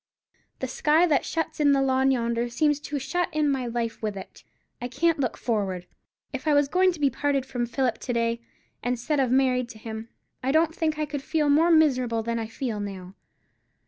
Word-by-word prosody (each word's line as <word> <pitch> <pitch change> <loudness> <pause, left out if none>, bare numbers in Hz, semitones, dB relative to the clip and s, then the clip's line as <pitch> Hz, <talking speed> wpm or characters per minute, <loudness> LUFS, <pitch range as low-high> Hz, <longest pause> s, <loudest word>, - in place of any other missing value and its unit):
"The 260 - -1
sky 305 +6 +3
that 300 -6 +2
shuts 325 -1 -3
in 290 -2 +5
the 275 - +3
lawn 265 0 +3
yonder 235 -2 0
seems 295 +4 +1
to 290 0 -4
shut 320 +7 -1
in 305 -1 +1
my 265 -3 0
life 230 -1 -3
with 210 -2 -3
it. 190 - -10 0.4
I 245 - -2
can't 330 +5 +1
look 255 -4 -1
forward. 195 -6 -2 0.5
If - - -5
I 300 - +4
was 285 -1 +4
going 370 +5 +3
to 330 - -10
be 280 -2 +3
parted 280 0 0
from 245 -2 -2
Philip 240 0 -1
to 245 - -3
day, 230 0 0 0.4
instead 250 +4 -1
of 260 -2 +2
married 255 -1 +2
to 225 - -10
him, 220 +1 -7 0.3
I 260 - 0
don't 320 +2 +3
think 315 -2 -1
I 305 - 0
could 290 -1 -5
feel 300 +1 0
more 320 +4 +4
miserable 255 -8 +3
than 230 0 -2
I 225 - -3
feel 225 -1 -4
now. 190 -2 -6
260 Hz, 210 wpm, -26 LUFS, 235-295 Hz, 0.5 s, in